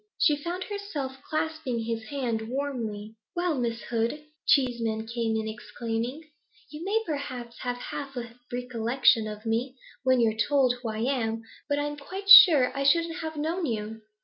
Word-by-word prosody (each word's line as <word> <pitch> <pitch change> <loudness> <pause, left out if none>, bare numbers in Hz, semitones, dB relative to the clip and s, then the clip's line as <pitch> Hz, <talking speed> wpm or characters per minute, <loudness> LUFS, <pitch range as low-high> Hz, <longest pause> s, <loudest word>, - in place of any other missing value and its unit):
She 300 - +4
found 345 +5 -4
herself 330 -11 -5
clasping 310 -6 -2
his 225 0 -3
hand 230 -5 -3
warmly. 230 -6 -4 0.2
'Well, 350 -1 +1
Miss 235 -1 -2
Hood,' 235 +6 -2 0.2
Cheeseman 235 -5 +2
came 230 -1 -1
in 220 - -3
exclaiming, 230 +5 -4 0.5
'you 305 +2 -7
may 430 +4 0
perhaps 255 -6 -5
have 245 -1 -3
half 275 +2 -6
a 235 -1 -5 0.2
recollection 245 -2 +2
of 210 +1 -8
me, 235 +4 -1 0.3
when 260 -1 +3
you're 225 -2 +3
told 255 +3 +2
who 235 - -3
I 215 0 -3
am, 225 -3 -1 0.3
but 285 - +1
I'm 295 0 -2
quite 385 +7 -7
sure 295 -11 +10
I 275 - -2
shouldn't 330 +4 +3
have 315 -1 -5
known 325 +3 -1
you. 220 -1 -4
250 Hz, 160 wpm, -27 LUFS, 225-295 Hz, 0.5 s, sure